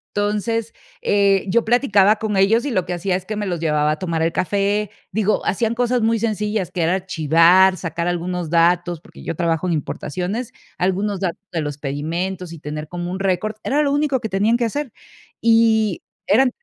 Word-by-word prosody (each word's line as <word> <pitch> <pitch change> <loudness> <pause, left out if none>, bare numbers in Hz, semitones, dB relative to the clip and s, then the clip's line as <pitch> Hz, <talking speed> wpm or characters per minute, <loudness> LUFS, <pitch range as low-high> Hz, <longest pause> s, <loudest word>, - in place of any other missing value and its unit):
Entonces, 210 +2 -1 0.3
eh, 200 - +3
yo 235 +4 +3
platicaba 215 -4 +4
con 215 -2 -3
ellos 215 +6 +3
y 285 - -2
lo 185 -5 0
que 180 - -3
hacía 180 +2 -1
es 185 0 -4
que 215 +2 -4
me 205 0 -3
los 175 -3 -2
llevaba 150 -2 +1
a 155 - -3
tomar 165 -3 -1
el 165 - +1
café. 200 +2 0 0.2
Digo, 215 +1 0
hacían 225 +4 0
cosas 245 0 +1
muy 225 +1 +2
sencillas, 210 -3 -1
que 175 - -2
era 170 +3 +2
archivar, 180 +1 +4
sacar 170 0 -3
algunos 175 -1 -2
datos, 175 0 +2
porque - - -15
yo 165 - -4
trabajo 170 +1 0
en 170 - +1
importaciones, 180 - -3 0.3
algunos 190 +2 0
datos 180 -3 -2
de 165 - -1
los 145 -1 -4
pedimentos 165 +6 -4
y 165 - -10
tener 150 0 -6
como 175 +1 -5
un 190 - -4
récord, 195 +3 -1
era 295 +2 +1
lo 280 - +1
único 290 -3 +1
que 220 - -4
tenían 210 +5 +2
que 240 - 0
hacer. 285 +3 -3 0.5
Y, 225 -4 +3 0.3
eran 250 +5 +4
190 Hz, 195 wpm, -20 LUFS, 170-220 Hz, 0.5 s, platicaba